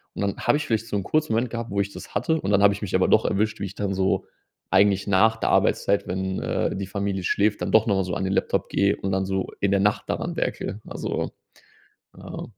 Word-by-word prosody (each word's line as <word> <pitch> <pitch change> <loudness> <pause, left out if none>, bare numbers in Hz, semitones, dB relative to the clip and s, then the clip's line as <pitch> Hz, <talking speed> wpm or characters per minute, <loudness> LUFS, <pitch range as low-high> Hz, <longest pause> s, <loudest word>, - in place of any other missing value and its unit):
Und - - -4
dann 100 -1 -1
habe - - +5
ich 150 - -4
vielleicht 115 0 -1
so - - -3
'n 100 - -2
kurzen 155 +5 0
Moment 115 +1 0
gehabt, 115 -1 -4
wo 100 0 -2
ich 100 0 -4
das - - -11
hatte 155 +10 +1
und 95 - -3
dann 100 -1 +3
habe 100 0 +6
ich 100 - -8
mich 100 - -2
aber - - +3
doch - - +4
erwischt, 110 +2 0
wie 100 - -2
ich 95 0 -8
dann 100 -1 -2
so 95 0 0 0.5
eigentlich 100 0 +3
nach 110 +3 +4
der - - -1
Arbeitszeit, 100 - +2
wenn, 95 +1 -2
äh, - - -1
die 95 0 -3
Familie 100 -1 -3
schläft, 105 +1 +1
dann 90 - -2
doch 110 +2 +4
nochmal 95 -2 +2
so 90 -1 -4
an 95 - -2
den 95 - -1
Laptop - - 0
gehe 100 +1 +2
und 95 - -3
dann 95 0 0
so 95 0 -1
in 100 - +2
der 100 - +3
Nacht 105 +1 +1
daran - - -3
werkele, 105 - -3
also, - - -3 0.9
ja. - - -7
100 Hz, 255 wpm, -24 LUFS, 95-110 Hz, 0.9 s, habe